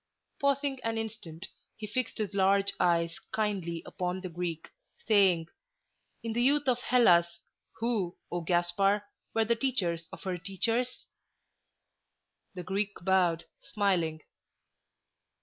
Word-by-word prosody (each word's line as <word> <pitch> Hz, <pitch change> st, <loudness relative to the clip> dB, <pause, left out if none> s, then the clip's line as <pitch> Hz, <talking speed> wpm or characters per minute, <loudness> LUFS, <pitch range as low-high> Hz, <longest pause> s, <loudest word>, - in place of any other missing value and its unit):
Pausing 280 Hz, -1 st, +1 dB
an 225 Hz, 0 st, -1 dB
instant, 205 Hz, -6 st, -5 dB, 0.3 s
he 215 Hz, -, -5 dB
fixed 225 Hz, +3 st, -2 dB
his 210 Hz, -3 st, -2 dB
large 195 Hz, 0 st, +3 dB
eves 170 Hz, -1 st, +2 dB
kindly 190 Hz, -6 st, -1 dB
upon 180 Hz, +1 st, -3 dB
the 185 Hz, -, -5 dB
Greek, 170 Hz, -1 st, -4 dB, 0.4 s
saying, 190 Hz, -6 st, +5 dB, 0.8 s
"In 230 Hz, -1 st, -2 dB
the 240 Hz, -, +1 dB
youth 280 Hz, +2 st, +3 dB
of 250 Hz, -2 st, +3 dB
Hellas, 175 Hz, -10 st, +4 dB, 0.4 s
who, 220 Hz, -6 st, -1 dB
O 175 Hz, -, -1 dB
Gaspar, 175 Hz, +4 st, +2 dB, 0.3 s
were 225 Hz, 0 st, +3 dB
the 235 Hz, +2 st, +2 dB
teachers 180 Hz, -11 st, -1 dB
of -, -, -10 dB
her 185 Hz, -2 st, -2 dB
teachers?" 225 Hz, +8 st, -1 dB, 1.5 s
The 180 Hz, -, -5 dB
Greek 200 Hz, +3 st, -1 dB
bowed, 180 Hz, -3 st, +2 dB
smiling. 175 Hz, -6 st, 0 dB
195 Hz, 120 wpm, -30 LUFS, 175-225 Hz, 1.5 s, saying